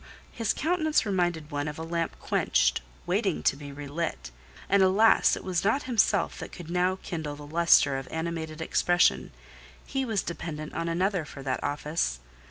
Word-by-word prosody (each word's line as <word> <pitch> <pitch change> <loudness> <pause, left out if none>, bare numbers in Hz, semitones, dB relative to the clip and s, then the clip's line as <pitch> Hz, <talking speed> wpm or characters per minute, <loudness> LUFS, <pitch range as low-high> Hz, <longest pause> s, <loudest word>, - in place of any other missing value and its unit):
His 230 -3 -1
countenance 315 -2 +1
reminded 175 -6 -1
one 145 +1 -2
of 150 - -5
a 160 - -5
lamp 165 0 -2
quenched, - - +1 0.2
waiting 75 - 0
to - - +3
be 145 0 -9
re 145 +1 -8
lit—and 140 - -3
alas! 195 +4 +5
it - - -8
was 180 -2 -1
not 225 +8 +2
himself 240 -5 +1
that - - -7
could 170 -2 -9
now 180 +1 +1
kindle 155 -4 -4
the 145 0 -10
lustre 150 -3 +4
of 135 - -9
animated 160 -1 -4
expression: 175 +1 +2 0.5
he 270 -1 -2
was 220 -6 -1
dependent 155 -3 -6
on 165 0 -2
another 180 +1 0
for 140 -2 -10
that 130 -2 -2
office! 145 - -1
165 Hz, 170 wpm, -28 LUFS, 145-185 Hz, 0.5 s, alas